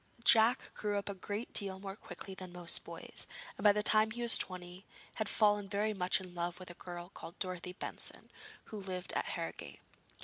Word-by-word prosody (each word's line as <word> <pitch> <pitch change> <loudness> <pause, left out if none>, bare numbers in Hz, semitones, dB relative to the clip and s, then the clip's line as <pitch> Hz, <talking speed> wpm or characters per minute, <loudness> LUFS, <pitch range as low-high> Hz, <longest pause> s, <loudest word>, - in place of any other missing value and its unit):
Jack 230 +3 +6
grew 205 -1 -1
up 200 0 -2
a - - -2
great 205 +4 -4
deal 195 -2 +5
more 195 0 -6
quickly 195 -2 -9
than 185 -1 -8
most 175 -1 -2
boys, - - -7 0.3
and - - -8
by 210 - +9
the 210 +1 +1
time 215 +1 +6
he 240 +2 -4
was 235 - +4
twenty 180 0 +1 0.3
had 215 -2 0
fallen 205 -2 +3
very 210 +2 +1
much 180 -2 +3
in 185 -2 -10
love 175 0 -3
with 185 -1 -8
a - - -9
girl 175 0 -8
called 170 - -10
Dorothy 180 -1 -3
Benson, - - -5 0.3
who 215 - -7
lived 185 -1 -4
at - - 0
Harrogate. - - -5
195 Hz, 200 wpm, -35 LUFS, 180-210 Hz, 0.3 s, by